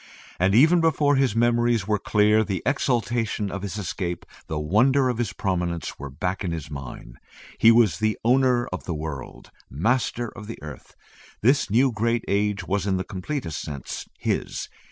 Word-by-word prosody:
And 95 +3 +3
even 160 +8 +6
before 150 -3 +3
his 135 -5 +2
memories 120 -2 +2
were 105 -1 +1
clear, 105 +1 +3
the 95 -4 -3
exultation 120 -6 0
of 100 - -5
his 100 +1 -5
escape, 90 -2 -4 0.2
the 80 - -3
wonder 125 - +3
of 120 -2 -2
his 115 -6 -1
prominence 90 -3 -2
were 70 +1 -6
back 90 +9 -3
in 90 - -2
his 80 -3 -5
mind. 65 -3 -8 0.4
He 115 - +7
was 110 -6 +3 0.2
owner 125 0 +3
of 90 - -6
the 85 - -3
world; 75 -3 -7 0.2
Master 120 - 0
of 105 - -9
the 115 - -6
Earth. 75 -4 -10 0.5
This 135 +6 +3
new 125 +5 +3
great 115 +1 0
age 105 0 0
was 100 +2 -1
in 95 -1 +1
the 95 - -2
completest 95 - -4
sense 70 -5 -6
his. - - -2
105 Hz, 170 wpm, -24 LUFS, 90-120 Hz, 0.5 s, He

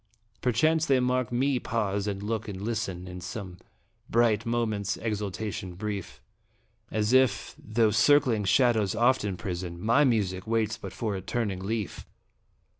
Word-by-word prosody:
Perchance 155 +7 +2
they 135 -2 +4
mark 125 -1 0
me 130 +2 +1
pause 105 -4 -1
and 100 -1 -3
look 110 0 -2
and 100 -3 -6
listen, 100 -4 -3
In 90 0 -7
some 90 -1 -7 0.5
bright 115 -2 +2
moment's 110 -4 -1
exaltation 105 -3 -4
brief, 95 - -5 0.7
As 110 +2 0
if, 125 -5 +3
though 110 0 +2
circling 115 0 +4
shadows 110 -1 +3
oft 120 +2 +3
imprison, 90 -3 -4
My 115 +9 +4
music 100 -8 0
waits 110 -1 +1
but - - -8
for 110 -3 -3
a 95 - -4
turning 100 -1 -2
leaf 105 +1 -4
110 Hz, 140 wpm, -28 LUFS, 100-120 Hz, 0.7 s, they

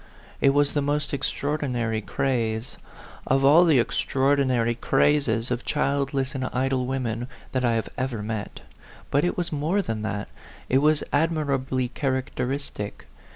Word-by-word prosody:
It 140 - +6
was 145 +1 +2
the 145 - +1
most 145 +1 -1
extraordinary 130 -5 -1
craze, 115 -1 -1 0.5
of 135 +1 +3
all 160 +6 +7
the 160 -5 +5
extraor 135 +3 +2
dinary 120 -4 +1
crazes 135 -5 +2
of 125 0 -1
childless 140 -1 0
and 130 -2 -2
idle 130 0 0
women, 120 -3 -2 0.2
that 130 -1 -1
I 120 -2 +3
had 115 -2 -1
ever 125 -5 -2
met; 110 -1 -5 0.5
but 140 - +3
it 175 - 0
was 175 -1 -2
more 160 +7 0
than 110 -7 -3
that, 105 -1 -3 0.4
it 130 - +4
was 150 +1 +3
admirably 140 -5 +1
characteristic. 130 -4 -3
135 Hz, 145 wpm, -25 LUFS, 120-145 Hz, 0.5 s, all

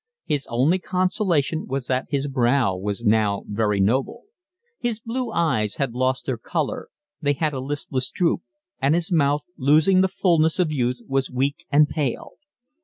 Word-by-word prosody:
His 145 -3 -1
only 135 +10 +2
consolation 180 -5 0
was 135 -1 -3
that 130 0 -1
his 140 -1 -1
brow 125 -5 +2
was 100 +4 -4
now 105 -2 +2
very 105 -1 0
noble. 130 - 0 0.6
His 235 -3 -2
blue 235 +1 -3
eyes 110 - 0
had 135 -4 -2
lost 130 +1 0
their - - -2
colour; - - -3 0.3
they 145 -2 +2
had 150 +1 -1
a 135 - -3
listless 135 -1 -2
droop; 175 -2 0 0.4
and 140 +4 +3
his 170 +1 -2
mouth, 145 -3 +2
losing 155 +7 +4
the 190 - +4
fulness 165 -4 +2
of 170 -5 +1
youth, 125 -3 -1
was 135 -1 0
weak 135 +3 -2
and 150 +1 +5
pale. 145 -6 -3
140 Hz, 165 wpm, -23 LUFS, 125-165 Hz, 0.6 s, and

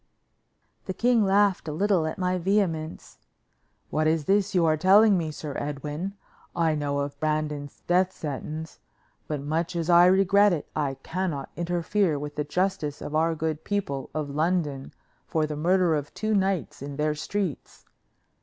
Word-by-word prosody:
The 190 - -4
king 240 -2 +3
laughed 200 -2 +2
a - - -2
little 180 0 +1
at 155 - -4
my 185 -1 0
vehemence. 170 -4 -1 0.7
"What 155 0 +1
is 160 -2 +1
this 200 +2 +2
you 175 -2 +4
are 155 -1 +3
telling 195 +6 +6
me, 165 -3 -1
Sir 150 -1 -6
Edwin? 150 +6 -4 0.4
I 165 -2 +2
know 145 -1 -1
of 140 0 -5
Brandon's 150 -2 -2
death 185 +1 +3
sentence, 155 +1 -6 0.5
but 150 -2 -3
much 165 +4 -2
as 170 0 0
I 175 +1 +7
regret 195 +2 +5
it, 155 - -3
I 140 -3 -1
cannot 165 -6 -3
interfere 175 0 0
with 145 +1 -6
the 150 - -1
justice 155 -2 -1
of 150 - -7
our 160 +1 +2
good 160 0 -3
people 165 -10 -3
of 150 -2 -2
London 150 -3 -1 0.4
for 160 -2 +1
the 150 0 -4
murder 175 +2 +2
of 145 -2 -2
two 215 0 -1
knights 190 - 0
in 140 0 -6
their 150 +1 0
streets. 175 +1 -4
160 Hz, 165 wpm, -26 LUFS, 150-185 Hz, 0.7 s, I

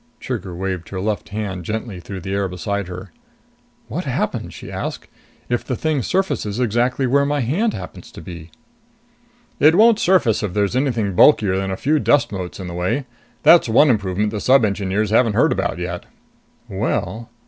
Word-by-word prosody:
Trigger 100 -8 -5
waved 95 -2 -4
her 95 - -5
left 105 +2 -2
hand 100 -3 -4
gently 110 0 -4
through 95 +2 -8
the 95 +3 -4
air 100 -1 0
beside 100 +2 -3
her. 90 +1 -8 0.8
"What - - -4
happens," - - -2
she - - -10
asked, - - -5 0.4
"if 120 -1 -1
the 125 - -3
thing 155 +1 0
surfaces 125 - -1
exactly 125 +3 +1
where 140 +3 +3
my 145 0 0
hand 180 - 0
happens - - -9
to - - -10
be?" 85 -2 -9 1.1
"It 155 +2 +6
won't 225 +2 +5
surface 170 - +3
if 100 -4 -3
there's 100 +2 +1
anything 120 -7 0
bulkier 100 -2 +5
than 95 0 -1
a 95 - -3
few 150 +7 +1
dust 145 -1 +2
motes 95 -2 -6
in 95 - -6
the 90 - -6
way. 90 +11 -1 0.4
That's 170 -8 +6
one 130 +5 +5
improvement 105 -1 0
the 105 -1 -4
Sub 130 -2 +5
Engineers 100 +1 -1
haven't 115 -1 +3
heard - - +4
about - - -1
yet." 90 0 -5 0.6
"Well...." 115 +2 -3
105 Hz, 180 wpm, -20 LUFS, 95-130 Hz, 1.1 s, It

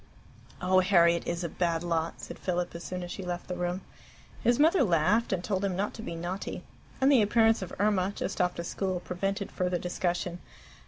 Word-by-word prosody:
"Oh, 185 +1 +5
Harriet 170 -3 +4
is 170 +1 -2
a - - 0
bad 170 0 -1
lot!" 165 -1 -1
said - - -8
Philip 180 -1 -1
as 170 0 -7
soon 180 0 -4
as 175 - -6
she - - -5
left 175 -1 -4
the 180 - -3
room. 180 +1 -2 0.6
His 240 +1 +4
mother 320 +4 +5
laughed, 190 +2 +3
and 185 -2 -1
told 195 -1 -1
him 195 -2 0
not 200 +3 -1
to 220 - -8
be 170 - -5
naughty; 175 +4 -4 0.4
and 270 +1 +5
the 260 -5 +6
appearance 225 +1 +4
of 185 - -5
Irma, 200 -2 +2
just 195 - -2
off 180 0 +1
to 170 - -4
school, 185 +1 -2
prevented 195 +3 -3
further 180 -1 0
discussion. 175 0 -2
180 Hz, 205 wpm, -29 LUFS, 175-200 Hz, 0.6 s, the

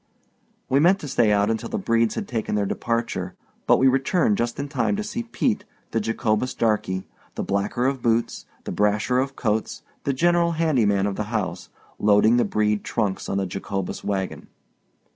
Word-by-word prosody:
We 135 - +3
meant 175 +6 +5
to 150 - -6
stay 120 -5 +3
out 105 +1 +3
until 110 - -3
the 230 - -2
Bredes 115 - +1
had 210 - -4
taken 110 -3 -2
their 105 -1 +1
departure; 115 -5 -2 0.3
but - - +6
we 135 - +4
returned 135 - +2
just 120 +2 -1
in 140 - -2
time 140 - 0
to 210 - -2
see 210 +3 -3
Pete, 230 -2 -1 0.3
the 115 - +1
Jacobus 115 +2 -1
darkey, 105 -4 0 0.3
the - - -2
blacker 100 +5 -1
of 135 -1 0
boots, 115 0 0 0.2
the - - -5
brasher 105 +5 +1
of 135 0 -4
coats, 110 -2 -2 0.2
the 140 - +1
general 170 +4 +2
handy 155 -9 +2
man 100 -1 +2
of 100 -1 -2
the 105 - -2
house, 105 -5 -3 0.3
loading 105 +3 +5
the 120 - +3
Brede 105 -1 0
trunks 105 -5 -2
on 95 - 0
the 100 - 0
Jacobus 95 +1 -4
wagon. 95 -2 -3
115 Hz, 185 wpm, -24 LUFS, 105-135 Hz, 0.3 s, but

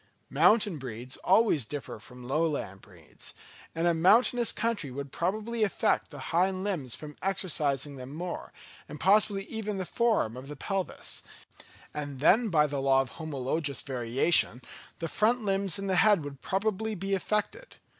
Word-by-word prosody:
Mountain 210 -7 +4
breeds 125 0 -5
always 190 - +3
differ 135 -1 -6
from 125 +3 -11
lowland 145 - -1
breeds; 85 -6 -12 0.4
and 165 +1 0
a 170 - +4
mountainous 225 +8 +4
country 225 -9 -2
would 140 +1 -6
probably 215 +8 -2
affect 200 - +1
the - - -10 0.2
hind 185 +2 +2
limbs 160 - -1
from 150 -1 -9
exercising 150 -7 0
them 130 +1 -8
more, 175 +4 -5 0.4
and 150 - -8
possibly 200 +2 +3
even 210 -1 -4
the 185 - -3
form 220 - +1
of 130 +2 -9
the 150 - -7
pelvis; 195 +6 -3 0.7
and 145 -3 -5
then 220 - +4
by 155 -4 +4
the 145 -2 -2
law 135 0 +4
of 130 -3 -6
homologous 140 -2 -2
variation, 125 +2 +2 0.4
the 165 - -3
front 225 +6 +1
limbs 195 -2 +1
and 195 0 -4
the 190 -1 +1
head 205 -5 +5
would 140 -2 -8
probably 215 +2 -1
be 195 +1 -3
affected. 210 - -2
170 Hz, 155 wpm, -29 LUFS, 140-205 Hz, 0.7 s, head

